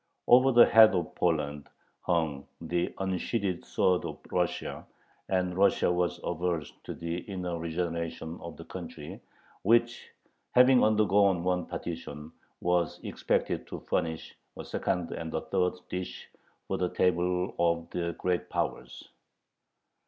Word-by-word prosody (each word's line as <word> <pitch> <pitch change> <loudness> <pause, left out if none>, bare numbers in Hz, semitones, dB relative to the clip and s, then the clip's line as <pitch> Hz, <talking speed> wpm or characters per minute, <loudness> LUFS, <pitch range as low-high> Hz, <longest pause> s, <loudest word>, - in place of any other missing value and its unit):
Over 130 +2 +7
the 120 -1 +8
head 110 -3 +7
of 85 -3 -2
Poland 75 -4 -1 0.3
hung 80 -5 -1
the 85 +1 -1
unsheathed 95 0 -2
sword 90 -1 +1
of - - -5
Russia, - - -2 0.4
and 90 -1 0
Russia 95 -2 +3
was 90 0 0
averse 85 -3 -2
to - - -5
the 85 0 -4
inner 90 -3 -4
regeneration 85 0 -3
of 85 - -8
the - - -10
country, - - -8 0.4
which, 120 +3 +2 0.5
having 125 0 +7
undergone 100 -4 +3
one 90 -1 0
partition, 80 -2 -6 0.3
was 90 -1 +1
expected - - -1
to - - -7
furnish 80 -1 -2 0.2
a - - -7
second 90 -3 -2
and 80 -1 -5
a - - 0
third 90 -1 0
dish 90 0 -5 0.4
for - - -1
the 90 -1 +1
table 90 +1 +1
of 85 -1 +1
the 85 -1 -2
Great 90 0 -1
Powers. - - -3
90 Hz, 130 wpm, -29 LUFS, 85-95 Hz, 0.5 s, the